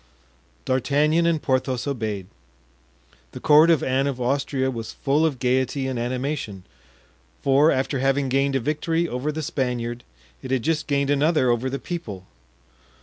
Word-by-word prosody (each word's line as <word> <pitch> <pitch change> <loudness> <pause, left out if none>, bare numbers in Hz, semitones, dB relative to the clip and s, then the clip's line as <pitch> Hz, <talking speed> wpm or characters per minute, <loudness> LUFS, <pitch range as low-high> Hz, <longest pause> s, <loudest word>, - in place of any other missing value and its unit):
D'Artagnan 150 +6 +2
and 165 -2 +2
Porthos 130 -2 -1
obeyed. 110 -8 -3 1.1
The - - -7
court 155 +2 +6
of 165 -5 +3
Anne 135 +2 +1
of 135 -3 -3
Austria 130 +1 0
was 115 -3 -6
full 150 +3 +1
of 145 -5 -3
gayety 130 +2 0
and 130 -2 -3
animation; 125 -5 -3 0.8
for, 140 +3 +4
after 135 0 0
having 135 +1 +1
gained 135 +1 +1
a - - +2
victory 160 +5 -1
over 125 +3 -2
the 155 +1 -4
Spaniard, 125 -5 -2 0.4
it 130 - -8
had 130 -3 0
just 160 -1 0
gained 140 -1 +1
another 145 -3 +3
over 120 +2 0
the 135 - -3
people. 115 - -6
135 Hz, 150 wpm, -23 LUFS, 125-150 Hz, 1.1 s, court